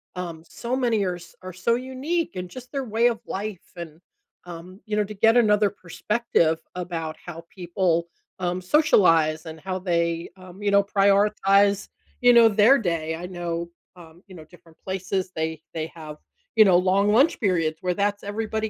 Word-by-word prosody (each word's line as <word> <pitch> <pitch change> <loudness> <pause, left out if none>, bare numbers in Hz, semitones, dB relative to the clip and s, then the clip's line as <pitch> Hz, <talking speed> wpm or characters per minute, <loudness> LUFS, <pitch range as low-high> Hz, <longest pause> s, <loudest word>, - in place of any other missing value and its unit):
um, 170 -3 -6
so 240 +2 -4
many 235 -5 +1
are 180 -1 -2
s 175 0 -14
are 185 0 -8
so 210 +6 0
unique 265 - -3
and 180 -1 -5
just 250 +2 -11
their 275 -2 -3
way 230 0 +2
of 235 -2 -1
life 200 -1 -6
and, 165 -2 -9 0.5
um, 175 +2 -10
you 215 - -2
know, 210 - +2
to 210 +1 -8
get 225 +3 +3
another 210 -3 +4
perspective 185 -3 -1 0.2
about 170 -3 -4
how 170 -1 -9
people, 175 -2 0 0.3
um, 180 0 -2
socialize 165 - +3
and 160 0 -8
how 185 +3 -4
they, 170 -2 -1
um, 185 +1 -13
you 205 - +1
know, 200 0 +5
prioritize, 200 0 +2 0.3
you 245 0 +6
know, 235 -1 +7
their 220 +6 +5
day. 165 - -2
I 170 +2 -7
know, 170 -2 -4 0.3
um, 170 -1 -16
you 190 - -13
know, 160 -3 -12
different 165 0 -20
places, 190 0 -3
they 160 -1 -3
they 160 0 -4
have, 155 -2 -9 0.4
you 220 - +8
know, 185 -3 +5
long 190 +3 +2
lunch 265 +9 +3
periods 165 -7 0
where 180 -1 0
that's 205 +1 -1
everybody 220 +1 -3
185 Hz, 180 wpm, -24 LUFS, 170-210 Hz, 0.5 s, you